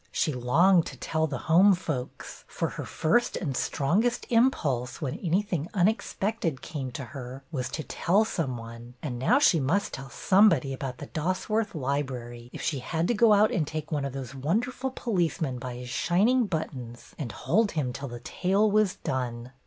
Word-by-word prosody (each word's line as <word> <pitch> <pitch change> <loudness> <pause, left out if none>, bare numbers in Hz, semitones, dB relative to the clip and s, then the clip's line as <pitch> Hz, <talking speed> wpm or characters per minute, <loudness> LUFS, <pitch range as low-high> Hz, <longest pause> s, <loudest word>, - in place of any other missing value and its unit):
She 155 - 0
longed 165 +9 +4
to 135 - -8
tell 160 +4 -1
the 140 -3 -3
home 185 +5 +6
folks, 150 -8 -5
for - - -2
her - - -6
first 170 +10 +1
and 140 -8 -3
strongest 205 - +1
impulse, 150 - +2
when 140 -6 -3
anything 175 -2 0
unexpected 195 -4 0
came 135 -5 -5
to 135 - -5
her, 130 0 -7
was 130 -5 -2
to 155 - -4
tell 200 +9 +2
some 135 - -2
one; 115 +1 -10
and 125 -6 -3
now 225 - +4
she 185 - +5
must 165 +9 0
tell 135 0 -7
some 200 - +5
body 135 -6 0
about 130 -1 -5
the - - -7
Dosworth 185 +6 -1
Library, 130 -4 -3
if - - -7
she 145 - -1
had 165 +6 -1
to - - +3
go 230 0 +5
out 210 +1 +5
and 155 -5 0
take 155 +1 -5
one 145 -2 0
of 140 -2 -3
those 135 -2 -6
wonderful 225 - -1
policemen 170 - -1
by 125 0 -6
his 125 0 -7
shining 215 - +2
buttons 130 -9 -5
and 130 -7 -3
hold 200 - +1
him 135 -6 -1
till 140 +2 -5
the 120 -1 -8
tale 195 - +1
was 210 -2 +3
done. 125 -2 -3
155 Hz, 185 wpm, -27 LUFS, 130-195 Hz, -, home